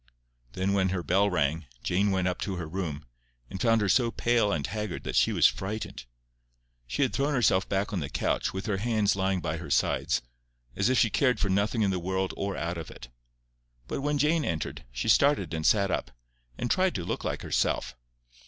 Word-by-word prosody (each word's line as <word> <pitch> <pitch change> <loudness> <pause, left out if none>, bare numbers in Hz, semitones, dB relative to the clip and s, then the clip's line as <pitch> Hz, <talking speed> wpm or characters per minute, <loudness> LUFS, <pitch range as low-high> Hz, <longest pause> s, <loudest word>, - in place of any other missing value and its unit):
Then 95 +5 0
when 95 -1 +2
her 90 -1 -2
bell 100 +4 +3
rang, 80 -2 0 0.2
Jane 100 +3 +1
went 95 -2 +1
up 90 - -2
to 95 - -2
her 85 -2 -4
room, 80 -5 -4 0.5
and 95 - -5
found 115 -2 +3
her 105 - +1
so 115 +5 +3
pale 115 -3 +1
and 75 -6 -1
haggard 105 -1 -4
that - - -4
she - - +4
was - - +3
frightened. 95 - -1 0.8
She 100 - 0
had 130 - 0
thrown 140 +1 0
herself 95 -6 +2
back 100 +2 -1
on 95 - 0
the 70 - -4
couch, - - -1
with 95 +2 -5
her 105 -3 0
hands 110 -1 +1
lying 95 -1 0
by 80 0 -2
her 85 - -8
sides, - - +1 0.5
as - - +2
if 130 - +2
she 115 - +3
cared 125 +4 +2
for 100 - 0
nothing 105 +4 +1
in 100 - +2
this 90 - -1
world 95 +2 -2
or 100 0 -3
out 85 0 -3
of 80 - -7
it. 65 - -11 0.8
But - - -3
when 145 +1 0
Jane 150 +3 +2
entered, 80 - -3
she - - -4
started 140 - +3
and 80 -1 0
sat 100 -3 +3
up, - - -2 0.5
and 120 0 -2
tried 185 -1 +2
to 85 - -3
look - - -3
like - - -3
herself. 70 - 0
95 Hz, 210 wpm, -28 LUFS, 90-115 Hz, 0.8 s, she